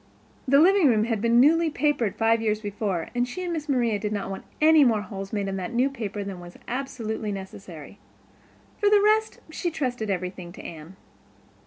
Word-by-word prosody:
The 275 +2 +5
living 370 0 +5
room 220 -4 +3
had 225 -2 -1
been 235 +1 +4
newly 325 +5 +5
papered 290 -9 0
five 225 0 +2
years 215 -1 0
before 205 -5 -3
and 245 0 0
she 365 +9 -6
and 350 -1 -3
Miss 305 -2 -5
Maria 235 -6 +1
did 210 0 -3
not 200 -2 -3
want 195 - -7
any 310 -1 +6
more 225 -5 +3
holes 195 -1 -7
made 205 -2 -2
in 195 0 -3
that 190 +6 -5
new 260 +3 +2
paper 210 -6 -5
than 195 -2 -6
was 175 0 -12
absolutely 230 -5 -4
necessary. 190 -4 -9 0.8
For 415 - +3
the 415 0 +6
rest 430 +2 +2
she 345 +2 -2
trusted 250 -9 -3
everything 180 -2 -4
to - - -10
Anne. 165 +2 -10
225 Hz, 195 wpm, -25 LUFS, 195-280 Hz, 0.8 s, any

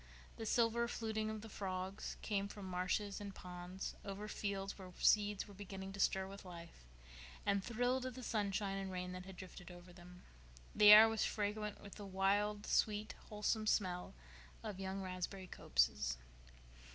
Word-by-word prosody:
The 225 - -4
silver 235 +1 +3
fluting 220 -2 -2
of 215 -1 -4
the 225 - -8
frogs 190 -1 -4
came 200 -2 0
from 200 -1 -8
marshes 185 +3 -1
and 200 -1 -6
ponds, 180 +1 -6
over 200 +1 -5
fields 200 -2 -3
where 185 -2 -10
seeds 205 -1 +3
were 205 - -11
beginning 195 -1 -7
to 200 - -8
stir 190 -1 +3
with 195 +1 -9
life 170 - -11 0.6
and 200 -1 +2
thrill 245 +3 +1
to 255 - -2
the 255 0 -8
sunshine 200 -3 0
and 190 -1 -4
rain 180 0 -3
that 180 +1 -7
had 190 - -8
drifted 185 -1 -9
over 175 0 -12
them. 180 0 -13 0.5
The 210 0 +9
air 215 +1 +12
was 225 0 +1
fragrant 210 0 -1
with 200 - -9
the 205 - -7
wild, 205 +2 +1
sweet, 215 0 +1 0.2
wholesome 215 0 0
smell 180 - +1 0.5
of 210 -4 -5
young 190 0 -3
raspberry 185 +1 -4
copses. 60 - +1
195 Hz, 165 wpm, -38 LUFS, 185-210 Hz, 0.6 s, air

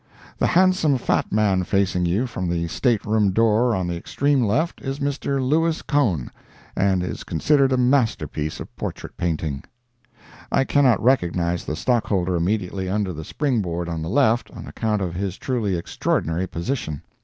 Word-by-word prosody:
The - - +3
handsome 185 -6 +3
fat 125 - 0
man 100 -3 +2
facing 95 -2 +1
you 100 +9 +1
from 95 -8 -4
the 85 -1 -1
stateroom 110 -2 +1
door 115 +2 +3
on 95 -2 -1
the 85 0 -2
extreme 140 +9 0
left, 145 +11 0
is 135 0 -3
Mr. 140 -1 -1
Louis 165 +3 +1
Cohn, 110 - 0 0.4
and 95 -2 +2
is 90 - -5
considered 135 - +2
a 130 - +2
masterpiece 125 - 0
of - - -9
portrait - - -6
painting. 80 -5 -2 0.9
I - - +3
cannot 135 -7 +3
recognize 90 -8 +1
the 75 - -3
stockholder 95 -4 0
immediately 95 +1 -1
under 100 -2 -1
the 80 0 -7
spring 130 - -1
board 85 -2 -3
on 85 -2 -3
the 80 - -4
left, 120 0 +2
on - - -10
account 105 -3 -1
of 90 -2 -3
his 95 +1 -3
truly 110 -8 -1
extraordinary 85 +1 -1
position. 85 - -4
105 Hz, 160 wpm, -23 LUFS, 90-130 Hz, 0.9 s, The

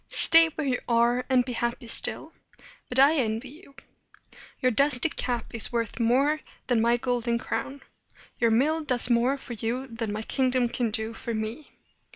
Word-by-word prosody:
"Stay 330 0 +5
where 310 - -3
you 255 -2 0
are, 235 +1 +2
and 255 -2 +3
be 250 - -5
happy 235 +1 -3
still. 230 - 0 0.6
But 250 - -3
I 280 +4 +5
envy 230 0 -2
you. 290 0 -16 0.8
Your 255 -2 +2
dusty 275 +4 +1
cap 245 -5 -4
is 225 0 0
worth 230 0 -3
more 270 +6 +2 0.3
than 240 -3 +1
my 235 +1 +3
golden 240 -1 -1
crown. 270 +4 -5 0.6
Your 235 - +3
mill 300 +8 +1
does 250 -3 +4
more 240 +4 +2
for 260 -2 -9
you 235 +4 -3
than 230 -4 -5
my 215 +1 -4
kingdom 255 -1 0
can 240 -1 -1
do 220 +1 -2
for 230 0 -5
me. 220 +7 -5
245 Hz, 175 wpm, -26 LUFS, 230-270 Hz, 0.8 s, Stay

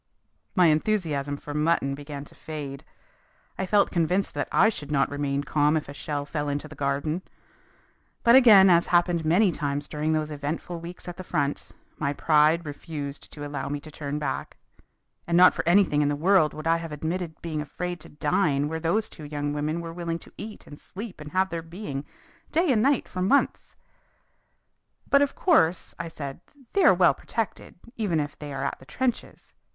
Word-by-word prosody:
My 180 -3 +5
enthusiasm 155 -5 0
for 145 - -8
mutton 150 -2 +1
began 145 0 -7
to - - -17
fade. 145 -3 -7 0.8
I 190 - -1
felt 205 +1 +3
convinced 180 +3 +1
that - - -2
I - - +5
should 150 -9 -6
not 140 -1 +2
remain 145 -1 -1
calm 150 +1 +2
if 155 - -4
a 140 - -8
shell 145 0 -4
fell 150 0 -3
into 145 +2 -3
the 155 - -11
garden. 145 +4 -1 1.0
But 235 +1 +7
again, 215 -7 +8
as 170 0 +4
happened 175 -1 +2
many 180 +5 +4
times 145 -2 -3
during 155 +1 -1
those 155 -1 -1
eventful 150 +4 -4
weeks 170 +2 -8
at 175 - -6
the 185 - -6
front, 145 -4 -2 0.3
my 145 -2 0
pride 155 +3 +3
refused 145 -1 -6
to 145 -1 -7
allow 145 -1 -4
me 145 0 -2
to 155 +2 -11
turn 145 -1 -4
back. 150 - -4 0.7
And 170 0 +2
not 180 +1 +8
for - - -2
anything 175 -5 +4
in 145 - +2
the 145 - 0
world 165 0 +3
would 155 - -7
I 165 0 +3
have 165 -1 -7
admitted 160 +2 -4
being 155 -3 -2
afraid 175 +4 -5
to - - -11
dine 145 -1 +1
where 160 +1 -3
those 200 +7 0
two 155 - -10
young 145 0 -3
women 155 +3 -2
were 165 -1 -7
willing 170 -1 -3
to - - -14
eat 215 0 -8
and 145 - -12
sleep 200 -4 -9
and 150 -1 -8
have 190 +1 +1
their 170 -1 -3
being 165 -4 -6 0.5
day 330 0 +2
and 220 -4 +3
night 275 +1 +2
for 185 - -5
months. 235 +10 +1 1.4
"But 280 - +6
of 285 -1 +1
course," 180 - +2
I 170 - -3
said, 140 -4 -7 0.3
"they 395 - +3
are - - +8
well 175 -5 +5
protected, 225 +8 -4 0.2
even 195 -8 0
if 145 -1 -3
they 150 -1 -7
are 135 0 -4
at 140 - -3
the 130 - -15
trenches. 255 -2 -3
155 Hz, 195 wpm, -26 LUFS, 145-180 Hz, 1.4 s, again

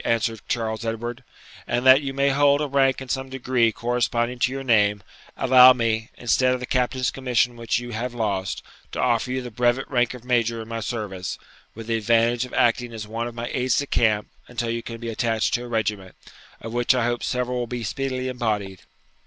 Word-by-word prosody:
answered 115 -2 0
Charles 110 -1 -2
Edward; 120 +2 -4 0.4
'and 120 +2 -1
that 130 +2 +8
you 135 -2 -3
may 140 +1 +1
hold 140 +1 +4
a 150 - 0
rank 135 -1 +2
in - - -11
some 130 +1 -3
degree 125 -3 +1
corresponding 120 +1 -1
to 125 - +2
your 135 0 -4
name, 105 -5 +3 0.3
allow 130 0 +8
me, 115 -2 -1
instead 125 +1 +2
of - - -5
the 125 - -4
captain's 125 0 0
commission 125 -2 0
which 115 -1 -1
you 120 0 -6
have 120 +3 -3
lost, 100 -5 -2 0.3
to - - -5
offer 125 0 +1
you 130 0 -2
the 125 - -7
brevet 120 +3 +1
rank 125 -1 +1
of 125 -1 -12
major 115 -2 +1
in 110 - -7
my 115 0 -4
service, 105 -5 -4 0.4
with 115 +1 -8
the 115 0 0
advantage 115 +2 +2
of 125 - -13
acting 120 0 +2
as 110 -2 -6
one 115 +2 -3
of 120 - -8
my 120 0 -4
aides 130 -1 +1
de 140 - +1
camp 110 -6 +1 0.2
until 120 -1 -3
you 115 0 -2
can 115 0 -7
be 115 0 -6
attached 115 -1 0
to 120 0 -1
a - - -8
regiment, 105 -5 -2 0.5
of 115 0 -7
which 120 +2 +2
I 125 -2 +1
hope 120 0 -1
several 125 0 -1
will 120 - -2
be 120 0 -4
speedily 130 +3 -3
embodied.' 105 -7 -2
120 Hz, 210 wpm, -23 LUFS, 115-125 Hz, 0.5 s, that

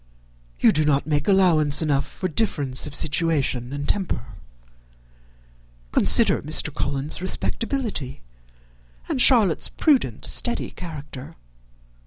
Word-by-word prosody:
You - - +4
do 155 - 0
not 145 -2 0
make 150 +2 -2
allowance 165 -7 +3
enough 140 -2 -1
for 185 - -5
difference 145 - 0
of 145 - -5
situation 140 -6 0
and 145 +1 -5
temper. 185 - -2 1.7
Consider - - +5
Mr. - - -1
Collins's 140 +4 -3
respectability, 210 - -3 0.9
and 255 - -1
Charlotte's 220 - +4
prudent, 260 - 0
steady 240 - -3
character. 145 -6 -10
150 Hz, 105 wpm, -22 LUFS, 140-190 Hz, 1.7 s, Consider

